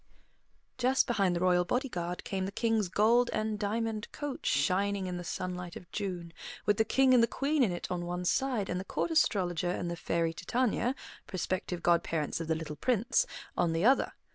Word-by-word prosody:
Just 255 +1 +3
behind 195 -6 +1
the - - 0
royal 180 0 +3
body 250 +9 -1
guard 175 -5 -4
came 190 -2 -2
the - - -5
King's 220 -3 +1
gold 235 +5 +4
and 215 -1 -1
diamond 220 +1 -2
coach 290 -2 -5
shining 190 +7 +1
in 180 -1 -3
the 175 - -5
sunlight 180 0 -4
of 175 - -11
June, 180 -5 -4 0.3
with 205 -1 +3
the 220 - +4
King 265 +3 +4
and 245 - +6
the 230 - +4
Queen 285 +4 0
in 225 -7 +3
it 175 - -4
on 175 -1 -2
one 180 +1 -3
side 245 -1 +1
and 180 - -2
the - - -4
Court 330 - -2
Astrologer 180 - +2
and 175 -1 -2
the - - -2
fairy 165 0 -1
Titania, 245 +5 0 0.3
prospective 185 -2 -3
godparents 165 -3 +1
of 165 - -4
the 160 - +1
little 155 -1 -5
Prince, 250 - +1 0.3
on 165 -2 +1
the 165 +4 +1
other. 265 +3 +4
195 Hz, 195 wpm, -31 LUFS, 175-230 Hz, 0.3 s, and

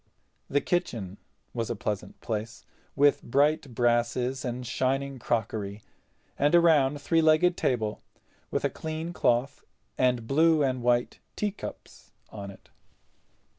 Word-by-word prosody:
The 145 - +2
kitchen 115 - -2 0.3
was 115 -2 -2
a 120 - -1
pleasant 105 -2 -4
place, 110 +1 -4 0.3
with 145 +1 +4
bright 140 0 +1
brasses 120 +2 +1
and 125 0 -4
shining 135 +2 -1
crockery, 110 -3 -2 0.6
and 145 +4 +4
a - - +8
round 145 -4 +4
three 165 +3 +2
legged 160 +3 +4
table 110 -8 -1 0.5
with - - -1
a - - +2
clean 160 +2 -5
cloth 125 -3 +1 0.4
and 125 -2 +2
blue 155 +4 +4
and 130 -2 0
white 120 0 +1 0.2
teacups 210 -1 -6 0.2
on 100 -2 -7
it. 100 - -14
130 Hz, 130 wpm, -28 LUFS, 115-150 Hz, 0.6 s, a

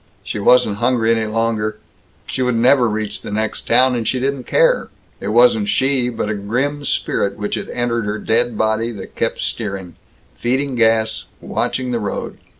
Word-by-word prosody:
She - - -4
wasn't 105 -1 +4
hungry 120 -1 +2
any 110 -1 -1
longer. 110 -1 -1 0.5
She - - -3
would 125 -1 +1
never 125 +1 +4
reach 110 -1 -3
the - - -7
next 110 +1 -2
town 125 +2 +4
and 115 -3 -2
she 130 - 0
didn't 135 0 -2
care. - - +2 0.3
It - - -5
wasn't 110 -1 +4
she, 130 0 +1
but 115 -3 -3
a 110 - -1
grim 125 +9 -2
spirit 100 -6 -1
which 105 0 -3
had - - -3
entered 120 -2 -1
her 105 +1 -2
dead 115 +1 0
body, 110 +1 +1
that 100 -3 -9
kept - - -1
steering, 95 -5 -4 0.4
feeding 130 - -1
gas, 110 -2 +2
watching 130 -1 -2
the 120 - 0
road. 105 -2 -4
115 Hz, 175 wpm, -19 LUFS, 110-125 Hz, 0.5 s, wasn't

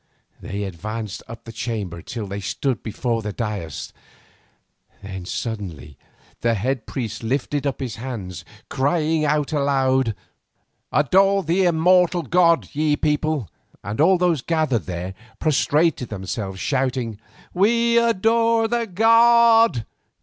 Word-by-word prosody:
They 100 +1 -4
advanced 105 +3 -5
up 115 0 -10
the 115 - -9
chamber 110 -7 -4
till 115 0 -6
they 100 +1 -5
stood 130 +5 -2
before 115 +1 -2
the 105 -1 -4
dais, 100 - -5 1.1
then 95 -2 -7
suddenly 100 - -5 0.4
the 115 -1 +1
head 125 +5 -2
priest 120 -5 -4
lifted 140 +4 -1
up 140 - -3
his 130 -5 -5
hands, 110 -8 -6 0.2
crying 155 +2 +1
aloud: 140 -5 +1 0.8
"Adore 195 +7 +3
the 180 +4 +2
immortal 175 +1 +3
god, 170 -1 +3
ye 150 0 +1
people," 150 -5 0 0.4
and 105 +6 -2
all 185 +4 +5
those 175 -5 +1
gathered 155 - 0
there 90 +1 -4 0.2
prostrated 155 -1 +1
themselves 95 -1 -5
shouting: 130 -4 -1 0.3
"We 235 +5 +3
adore 230 +1 +2
the 235 0 -1
god." 230 - +5
135 Hz, 120 wpm, -22 LUFS, 110-175 Hz, 1.1 s, all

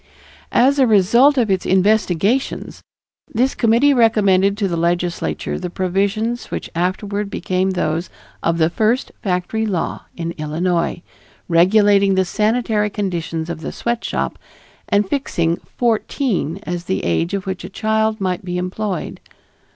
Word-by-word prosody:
As 275 +3 +4
a 260 - +5
result 235 +8 +5
of 230 -5 +2
its 190 -1 +1
investigations, 200 +4 +1 0.5
this 250 +4 +1
committee 240 +5 +3
recommended 200 -5 +3
to 205 -2 0
the 175 - -2
Legislature 170 +1 -1
the 180 - -4
provisions 200 +6 -1
which - - -5
afterward 200 +4 -2
became 185 -1 -1
those 170 -2 -1 0.3
of 165 0 0
the 160 0 +2
first 220 +7 +1
factory 185 +3 -1
law 195 -6 -2
of 170 -1 -3
Illinois, 170 +3 -1 0.4
regulating 195 +3 +4
the 190 0 +2
sanitary 215 +1 +1
conditions 170 -5 -3
of 170 -2 -5
the - - -5
sweatshop 235 0 -2 0.5
and 205 0 +2
fixing 170 - 0 0.2
fourteen 225 - 0
as 175 -3 -4
the 95 - -2
age 165 - 0
at 200 0 -4
which 190 -2 -4
a 180 - -7
child 220 +1 0
might 185 -2 -2
be 180 -1 -3
employed. 185 +1 -3
195 Hz, 135 wpm, -19 LUFS, 175-220 Hz, 0.5 s, a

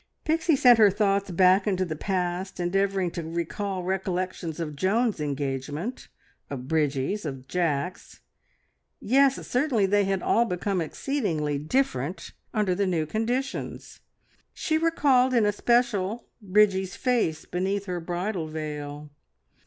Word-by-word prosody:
Pixie 320 0 +2
sent 245 -3 +6
her 210 -2 +8
thoughts 200 0 +1
back 185 +3 +4
into 185 -2 +1
the 160 -3 -4
past, 185 +2 -2
endeavouring 190 0 0
to 170 - -4
recall 180 +4 -3
recollections 185 -3 -3
of 150 -3 -4
Joan's 210 +7 +1
engagement, 145 - -3 0.4
of 130 -2 -6
Bridgie's, 150 +5 0
of 135 -4 -6
Jack's. 175 0 -2 0.8
Yes, 270 +4 +4
certainly 250 -5 +2
they 205 +1 +2
had 195 -1 -1
all 235 - +3
become 185 -2 -1
exceedingly 160 - -2
different 155 - -1 0.2
under 210 -4 +1
the 200 +2 0
new 165 -4 0
conditions. 235 - -3 0.6
She 315 0 0
recalled 270 -6 +3
in 230 -3 +4
especial 225 0 +1 0.2
Bridgie's 190 -1 +2
face 235 -11 0
beneath 195 +3 -2
her 180 -2 -3
bridal 175 +1 -3
veil. 150 -1 -6
190 Hz, 125 wpm, -26 LUFS, 160-215 Hz, 0.8 s, her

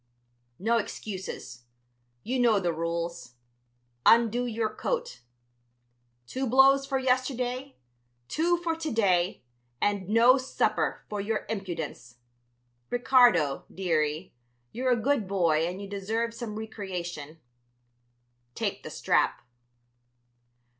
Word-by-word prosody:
"No 230 +5 +2
excuses. 185 - -6 0.6
You 255 +3 -1
know 230 -4 +4
the 175 -3 0
rules. 170 -5 -4 0.7
Undo 235 +1 +4
your 220 -2 -2
coat; 485 0 -3 1.0
two 260 - -3
blows 270 +2 +5
for 270 -1 0
yesterday, 255 0 -1 0.5
two 345 - +1
for 335 -1 -2
to 320 -1 -4
day, 185 - +1 0.4
and 200 -2 0
no 235 +4 +6
supper, 260 - -1
for 210 -1 -3
your 215 +2 -2
impudence. 165 - -5 0.7
Ricardo, 240 - +4
dearie, 160 -2 -1 0.4
you're 255 +2 -1
a - - +5
good 240 -2 0
boy 165 -4 +2
and 180 +2 -5
you 200 - -7
deserve 220 +4 -2
some 230 -3 -6
recreation. 175 -8 -6 1.2
Take - - -2
the - - -8
strap." 120 - +1
215 Hz, 105 wpm, -28 LUFS, 175-250 Hz, 1.2 s, no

